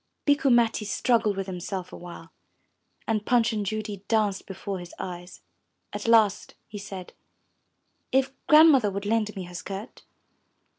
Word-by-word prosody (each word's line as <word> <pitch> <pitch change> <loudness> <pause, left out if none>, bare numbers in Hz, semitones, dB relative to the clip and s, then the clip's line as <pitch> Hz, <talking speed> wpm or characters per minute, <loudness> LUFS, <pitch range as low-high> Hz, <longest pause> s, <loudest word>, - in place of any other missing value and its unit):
'* - - -53
Bikku 285 -1 +3
Matti 235 -2 +3
struggled 210 +1 +1
with 195 - -2
himself 185 0 -5
a - - -6
while, 170 -1 -11 0.8
and 215 -2 0
Punch 230 -1 +2
and 210 -1 -1
Judy 210 -1 -4
danced 210 -4 0
before 195 0 -5
his 175 0 -10
eyes. 180 0 -8 0.5
At - - -5
last 220 -4 +3
he 210 - -8
said, 195 -2 -8 1.0
'*If 265 0 +2 0.2
Grandmother 300 -8 +7
would 200 +1 -5
lend 215 0 0
me 190 - -5
her 180 0 -11
skirt? 195 +5 -7
205 Hz, 150 wpm, -26 LUFS, 190-230 Hz, 1.0 s, Grandmother